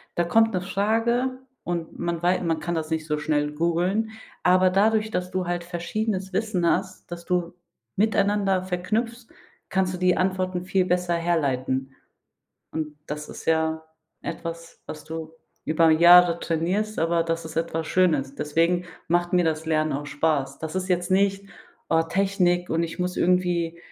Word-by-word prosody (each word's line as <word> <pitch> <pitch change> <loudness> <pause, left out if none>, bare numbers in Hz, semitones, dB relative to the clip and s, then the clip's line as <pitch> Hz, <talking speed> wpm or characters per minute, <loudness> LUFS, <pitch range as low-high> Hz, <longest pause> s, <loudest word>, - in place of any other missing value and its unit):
Da 175 - +2
kommt 225 +4 +3
'ne 185 - 0
Frage 225 +7 0 0.2
und 170 -2 -4
man 170 -1 -2
wei 180 +1 +3
man 165 -3 0
kann 170 +2 -3
das 160 -1 -3
nicht 160 -1 -2
so 150 -1 0
schnell 150 -1 0
googeln. 175 +7 0 0.3
Aber 185 +1 +5
dadurch, 215 +2 +2
dass 180 -3 -2
du 185 -1 -2
halt 175 0 -2
verschiedenes 190 +3 -3
Wissen 200 -3 0
hast, 185 0 -2
das 170 0 -7
du 175 -1 -1 0.4
miteinander 200 -2 +2
verknüpfst, 220 +6 -2 0.4
kannst 190 -1 0
du - - -6
die 180 0 +3
Antworten 185 -1 -1
viel 185 0 +1
besser 180 -1 +1
herleiten. 135 -6 -1 0.8
Und 155 -2 -4
das 150 0 -6
ist - - -10
ja 160 0 +1 0.4
etwas, 165 0 -7
was 155 -1 -8
du 160 0 -7 0.3
über 160 +1 +3
Jahre 170 +1 +7
trainierst, 185 +7 -1
aber 165 +1 +2
das 165 0 -2
ist 160 - -10
etwas 165 -1 -1
Schönes. 155 -8 +1
Deswegen 165 +5 +1 0.2
macht 175 +1 +1
mir 180 -1 +3
das 160 -1 -1
Lernen 155 -1 +1
auch 145 +1 -4
Spaß. 145 -2 -1
Das 160 +1 -5
ist 185 0 -2
jetzt 175 0 0
nicht: 195 +1 +2 0.4
Oh, 165 0 +4
Technik 180 0 +1
und 165 +1 +1
ich 165 - -7
muss 180 0 -2
irgendwie 175 -2 +1
175 Hz, 165 wpm, -25 LUFS, 160-185 Hz, 0.8 s, Jahre